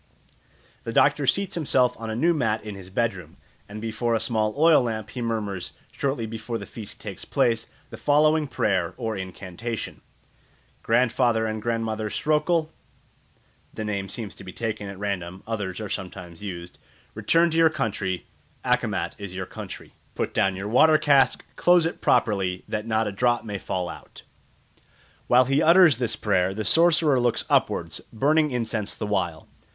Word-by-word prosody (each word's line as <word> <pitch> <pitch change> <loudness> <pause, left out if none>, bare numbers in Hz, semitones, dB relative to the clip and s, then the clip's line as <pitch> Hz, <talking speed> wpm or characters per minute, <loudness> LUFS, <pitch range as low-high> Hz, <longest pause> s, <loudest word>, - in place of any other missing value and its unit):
The - - -4
doctor - - +3
seats 200 -2 +1
himself 130 -6 +2
on 115 -1 -5
a 110 - -3
new 170 +8 +3
mat 115 -8 0
in 105 -1 -6
his 95 -2 -10
bedroom, 95 -5 -2 0.3
and 105 +1 -7
before 115 +1 -1
a - - +1
small 110 -2 0
oil 160 0 +6
lamp 110 -3 -3
he 125 - -5
murmurs, 105 -6 -3 0.2
shortly 135 -4 -2
before 115 +1 -5
the - - -7
feast 110 -4 -9
takes - - -7
place, 115 -1 +1 0.2
the - - -8
following 150 +1 +3
prayer 95 -8 0
or 115 -3 -3
incantation: 95 +4 -6 0.8
"Grandfather 120 -1 +2
and 110 -1 -3
Grandmother 110 -1 -2
Sroekoel" 155 +4 +1 1.0
(the 110 - -4
name 100 -2 -3
seems 110 -4 -6
to - - -12
be 95 - -8
taken 110 -2 -4
at 100 - -8
random; 95 -2 -4
others 105 -5 -3
are 110 - -4
sometimes 90 -2 -7
used), 90 -3 -7 0.3
"return 170 0 +3
to 160 - -1
your 165 -1 +6
country. 100 - -2 0.4
Akkemat - - 0
is 100 -2 -7
your 95 0 -3
country. - - -9 0.2
Put - - -2
down 95 -3 +2
your 95 +2 -5
water 155 +8 +5
cask, 140 -3 +3
close 175 -2 +4
it 165 - -3
properly, 95 -4 +1
that 105 +1 -3
not 110 0 +1
a - - -2
drop 120 +4 +1
may 105 -2 -4
fall 90 -1 -3
out." - - -11 1.0
While 125 +1 +5
he 135 +3 +2
utters 170 -6 +6
this 120 -3 -1
prayer 95 -2 +1
the 110 0 -3
sorcerer 160 - +4
looks 120 -2 +1
upwards, - - +1
burning 150 +6 +2
incense 115 -4 -2
the 110 - -4
while. 90 -6 -2
110 Hz, 165 wpm, -25 LUFS, 100-130 Hz, 1.0 s, oil